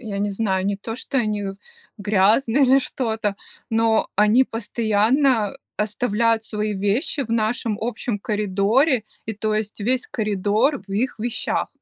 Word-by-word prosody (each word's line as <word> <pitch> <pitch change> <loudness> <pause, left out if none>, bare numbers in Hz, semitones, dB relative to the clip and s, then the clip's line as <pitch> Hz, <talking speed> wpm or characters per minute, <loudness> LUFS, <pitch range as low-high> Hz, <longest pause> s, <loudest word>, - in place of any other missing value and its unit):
я 210 -4 -5
не 205 0 0
знаю, 195 -2 -1
не 200 - 0
то, 225 +3 -6
что 265 +1 -2
они 210 -3 -1 0.5
грязные, 215 +6 +3
или 265 +1 +5
что-то, 220 -6 -2 0.4
но 225 0 +2
они 210 +5 +5
постоянно 225 +1 +1 0.2
оставляют 220 +1 0
свои 210 -1 -2
вещи 205 - 0
в 225 - -10
нашем 225 -1 0
общем 225 -1 -3
коридоре, 215 +5 +1 0.2
и 220 - -2
то 215 +1 -2
есть 215 0 -3
весь 250 +4 0
коридор 215 +5 0
в - - -14
их 245 +6 -1
вещах. 235 +2 -2
220 Hz, 140 wpm, -22 LUFS, 205-240 Hz, 0.5 s, или